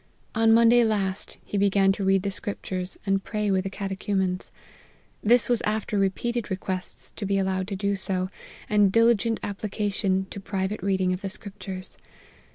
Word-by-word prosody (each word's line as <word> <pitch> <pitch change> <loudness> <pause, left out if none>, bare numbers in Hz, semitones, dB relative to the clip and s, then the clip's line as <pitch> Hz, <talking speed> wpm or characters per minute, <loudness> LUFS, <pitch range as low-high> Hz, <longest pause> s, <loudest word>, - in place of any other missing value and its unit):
On 225 0 +4
Monday 235 +1 +6
last, 200 -4 -1
he 205 - -2
began 195 -1 +4
to 195 0 -2
read 195 0 +3
the 200 - -1
Scriptures, 185 -2 -4
and 195 -1 +1
pray 210 -2 -1
with 190 0 +1
the - - -1
Catechumens. 190 -1 -2 0.7
This 240 +3 +4
was 240 -2 +2
after 215 +1 -1
repeated 225 +4 0
requests 185 -1 -3
to - - -7
be 200 0 +1
allowed 190 -1 0
to 200 - -3
do 200 +1 0
so, 185 -1 -2 0.4
and 205 -2 +4
diligent 230 0 +3
application 200 -1 -1
to - - -6
private 195 +1 -2
reading 190 -1 +1
of 180 - -4
the 195 - -3
Scriptures. 190 -2 -8
195 Hz, 165 wpm, -26 LUFS, 190-210 Hz, 0.7 s, Monday